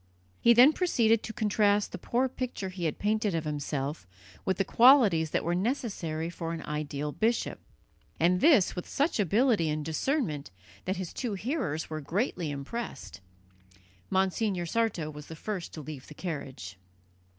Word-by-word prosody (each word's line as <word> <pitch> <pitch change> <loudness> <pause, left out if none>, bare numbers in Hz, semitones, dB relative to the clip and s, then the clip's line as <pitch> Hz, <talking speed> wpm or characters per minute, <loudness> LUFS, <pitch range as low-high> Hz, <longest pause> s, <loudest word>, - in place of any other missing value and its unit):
He 235 - +6
then 255 +6 +8
proceeded 230 - +2
to - - -6
contrast 210 -2 +2
the - - -6
poor 250 +2 +1
picture 250 -6 -4
he 180 -2 -5
had 155 - -1
painted 210 -2 0
of 165 - -1
himself 145 - -3 0.4
with 190 -1 +1
the 195 - +1
qualities 225 - +6
that - - 0
were 170 - 0
necessary 185 - -2
for 165 -1 -5
an 165 - -5
ideal 150 -1 -3
bishop, 225 +8 0 0.6
and 180 +3 +3
this 280 - +5
with 180 - -6
such 285 -3 0
ability 205 - +3
and 150 0 -2
discernment 160 - -1 0.4
that 190 - -1
his 185 -2 -5
two 235 -6 -3
hearers 205 - -2
were 155 0 -3
greatly 175 - -1
impressed. 145 - -6 0.9
Monsignor 190 -1 0
Sarto 185 -5 -1
was 150 -1 -10
the 160 - -8
first 190 +2 -5
to 155 - -6
leave 145 -3 -8
the 150 - -12
carriage. 135 - -6
185 Hz, 160 wpm, -29 LUFS, 155-225 Hz, 0.9 s, then